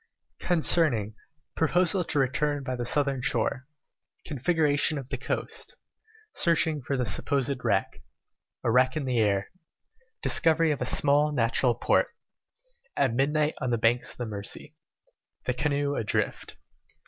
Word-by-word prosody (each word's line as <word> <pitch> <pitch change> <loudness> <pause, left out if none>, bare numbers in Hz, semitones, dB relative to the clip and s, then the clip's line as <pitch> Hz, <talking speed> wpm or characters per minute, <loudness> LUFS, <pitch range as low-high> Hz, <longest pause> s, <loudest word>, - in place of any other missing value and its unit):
CHAPTER 170 -1 +3
V 110 -4 -4 0.4
Proposal 175 +3 +2
to - - -2
return 140 +2 0
by 130 -1 -3
the 120 -1 -4
Southern 140 0 +1
Shore 125 +2 -1 0.6
Configuration 150 +1 +1
of 135 -2 -7
the 135 - -3
Coast - - -3 0.6
Searching 160 -3 +2
for 135 +2 -2
the 125 - 0
supposed 135 +1 -1
Wreck - - -1 0.6
A 115 - +1
Wreck 130 +4 +3
in 145 - -2
the 125 -2 0
Air 100 -2 +1 0.8
Discovery 165 0 +4
of 145 - -3
a 125 - -1
small 145 +3 +3
Natural 120 -2 +1
Port - - +2 0.9
At 130 - +2
Midnight 150 +4 +1
on 130 - -1
the 120 - +1
Banks 115 +2 +1
of - - -6
the 120 - -4
Mercy 100 -2 -4 0.7
The 125 - 0
Canoe 145 +1 -1
Adrift. 115 -6 -2
135 Hz, 140 wpm, -27 LUFS, 125-150 Hz, 0.9 s, Discovery